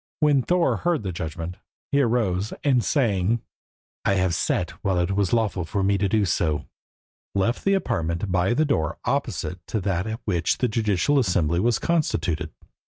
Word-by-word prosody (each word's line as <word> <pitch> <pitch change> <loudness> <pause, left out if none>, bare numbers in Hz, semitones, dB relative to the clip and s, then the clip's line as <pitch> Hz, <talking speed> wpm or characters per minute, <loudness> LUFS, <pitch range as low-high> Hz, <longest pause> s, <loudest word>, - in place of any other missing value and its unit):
When 150 -3 +4
Thorer 175 +5 +2
heard 170 -7 0
the 95 - -2
judgment, 85 +1 -5 0.3
he 140 - +4
arose, 110 -6 0
and 130 -5 +3
saying 115 - +1 0.6
"I 100 - +2
have 95 -2 +1
sat 85 0 0
while 95 -2 +1
it 90 +1 +1
was 100 -2 +1
lawful 110 -6 +1
for 95 +4 -2
me 100 0 +2
to 100 0 +1
do 105 0 +2
so," 80 -5 0 0.7
left 100 +5 0
the 195 0 +3
apartment 85 - -1
by 90 +6 +2
the 155 +4 +3
door 80 - 0
opposite 90 - -2
to 110 - -1
that 95 0 -1
at 110 +1 -4
which 85 -5 +1
the 125 - +1
judicial 110 +5 +1
assembly 90 - +1
was 115 +3 +2
constituted. 85 - 0
100 Hz, 170 wpm, -24 LUFS, 90-120 Hz, 0.7 s, When